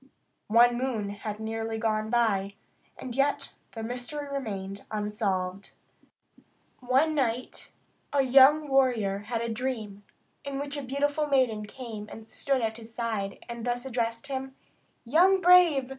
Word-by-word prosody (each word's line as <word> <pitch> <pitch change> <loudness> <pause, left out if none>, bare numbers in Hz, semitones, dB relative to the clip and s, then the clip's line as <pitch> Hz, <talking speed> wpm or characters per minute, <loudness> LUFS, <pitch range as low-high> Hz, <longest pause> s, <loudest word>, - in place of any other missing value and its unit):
One 240 +2 +5
moon 235 -6 -2
had 210 +1 -6
nearly 225 0 -3
gone 215 -1 -1
by, 205 -4 +1 0.4
and 245 -2 -7
yet 280 +1 0 0.2
the 225 - -6
mystery 250 +5 -4
remained 200 -8 -5
unsolved. 200 -3 -2 1.1
One 265 +5 +2
night 255 -4 -2 0.4
a 280 -1 +3
young 275 +4 +6
warrior 245 -8 +2
had 225 +3 -3
a 235 - -2
dream, 225 -4 -4 0.4
in 280 -1 -4
which 285 +1 -4
a 285 - -3
beautiful 290 +3 -1
maiden 245 -7 +1
came 220 -3 -8
and 225 0 -10
stood 270 +1 -1
at 220 0 -2
his 230 0 -11
side, 225 -4 -4
and 235 -1 -6
thus 245 +1 -2
addressed 235 -1 -2
him: 265 -1 -5 0.5
"Young 360 +10 +4
brave! 345 -7 +5
240 Hz, 140 wpm, -28 LUFS, 220-270 Hz, 1.1 s, young